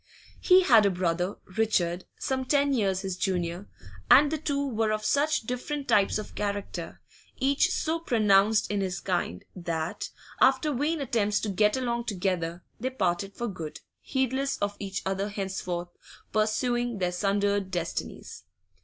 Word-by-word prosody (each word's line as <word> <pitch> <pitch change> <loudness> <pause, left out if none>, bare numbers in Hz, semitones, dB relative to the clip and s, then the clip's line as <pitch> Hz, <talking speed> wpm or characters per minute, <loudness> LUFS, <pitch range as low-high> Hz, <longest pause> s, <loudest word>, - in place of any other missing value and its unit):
He 370 0 +6
had 225 - +6
a - - +4
brother, 180 0 -1 0.2
Richard, 180 -5 +1
some 260 -1 -1
ten 280 +1 +2
years 195 -6 +1
his 190 -2 -3
junior, 180 0 -2 0.4
and 290 +2 +7
the 315 - -1
two 280 -1 -1
were 225 -3 0
of 215 0 -2
such 300 +4 +2
different 250 +5 -4
types 200 0 +3
of 215 - -7
character, 200 -4 -4 0.4
each 275 +1 +2
so 325 +1 -1
pronounced 215 -7 +3
in 205 -1 0
his 185 -1 -2
kind, 175 - -2
that, 165 -2 -3 0.3
after 270 +3 +4
vain 295 +4 0
attempts 215 -5 +1
to 215 - -2
get 210 +4 +2
along 235 -2 -1
together, 180 -4 -2 0.2
they 255 +3 -1
parted 195 -4 -1
for 240 - -3
good, 165 -7 -6 0.2
heedless 265 +1 -1
of 205 0 -2
each 195 -1 -4
other 195 +2 -1
henceforth, 190 -3 -4 0.4
pursuing 240 +2 +1
their 180 -2 0
sundered 200 +1 0
destinies. 175 -3 -5
205 Hz, 150 wpm, -28 LUFS, 185-255 Hz, 0.4 s, and